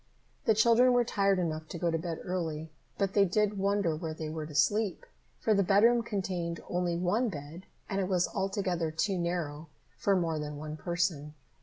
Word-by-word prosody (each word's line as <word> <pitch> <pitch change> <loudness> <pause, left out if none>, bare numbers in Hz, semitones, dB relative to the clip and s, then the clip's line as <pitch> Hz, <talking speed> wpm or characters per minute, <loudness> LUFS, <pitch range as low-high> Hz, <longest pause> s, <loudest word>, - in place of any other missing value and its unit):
The 220 - +4
children 235 +3 +5
were 245 0 +4
tired 200 -3 +2
enough 160 -3 -2
to 170 - -6
go 170 0 0
to 165 - +1
bed 165 -1 -4
early, 160 -4 -3 0.3
but 195 -1 0
they 200 - +5
did 205 +2 +1
wonder 200 -4 +1
where 160 0 -5
they 155 -1 -5
were 155 -1 -5
to 150 - -10
sleep, 205 +6 +1 0.3
for 220 - +2
the 200 - +3
bedroom 210 +6 +4
contained 185 -6 -3
only 175 -1 0
one 210 +8 +1
bed, 155 +1 -8 0.2
and 195 -1 -1
it 185 - -1
was 180 -2 +2
altogether 190 -4 -1
too 180 +4 -1
narrow 165 -3 -3 0.3
for 200 - +2
more 165 -4 0
than 150 -1 -5
one 155 +1 -6
person. 170 -3 -2
180 Hz, 190 wpm, -30 LUFS, 160-200 Hz, 0.3 s, children